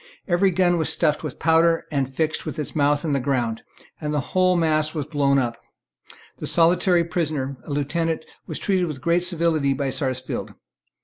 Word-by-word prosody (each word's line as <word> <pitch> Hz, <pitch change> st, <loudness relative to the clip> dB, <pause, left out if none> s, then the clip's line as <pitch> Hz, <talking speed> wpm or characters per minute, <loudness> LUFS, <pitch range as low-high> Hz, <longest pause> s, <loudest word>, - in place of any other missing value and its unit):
Every 185 Hz, +1 st, +3 dB
gun 175 Hz, -1 st, +2 dB
was 160 Hz, -, +1 dB
stuffed 150 Hz, -3 st, +1 dB
with 155 Hz, -, -5 dB
powder, 165 Hz, +1 st, +3 dB
and 135 Hz, -3 st, -1 dB
fixed 155 Hz, +3 st, -1 dB
with -, -, -6 dB
its 150 Hz, +1 st, -4 dB
mouth 145 Hz, 0 st, +2 dB
in 150 Hz, -, 0 dB
the 140 Hz, -, +1 dB
ground; 125 Hz, -4 st, -1 dB, 0.4 s
and 150 Hz, -1 st, -2 dB
the 150 Hz, -, 0 dB
whole 185 Hz, 0 st, +3 dB
mass 155 Hz, -2 st, +1 dB
was 150 Hz, -3 st, -2 dB
blown 140 Hz, -2 st, +1 dB
up. 120 Hz, -3 st, -1 dB, 0.8 s
The -, -, -3 dB
solitary 175 Hz, +1 st, +4 dB
prisoner, 155 Hz, -5 st, -2 dB
a -, -, -11 dB
lieutenant, 160 Hz, +3 st, -1 dB, 0.2 s
was -, -, -4 dB
treated 185 Hz, -3 st, 0 dB
with 150 Hz, -4 st, -5 dB
great 170 Hz, +5 st, +1 dB
civility 165 Hz, -5 st, +2 dB
by 135 Hz, -1 st, -2 dB
Sarsfield. 130 Hz, -3 st, -3 dB
155 Hz, 180 wpm, -23 LUFS, 140-170 Hz, 0.8 s, solitary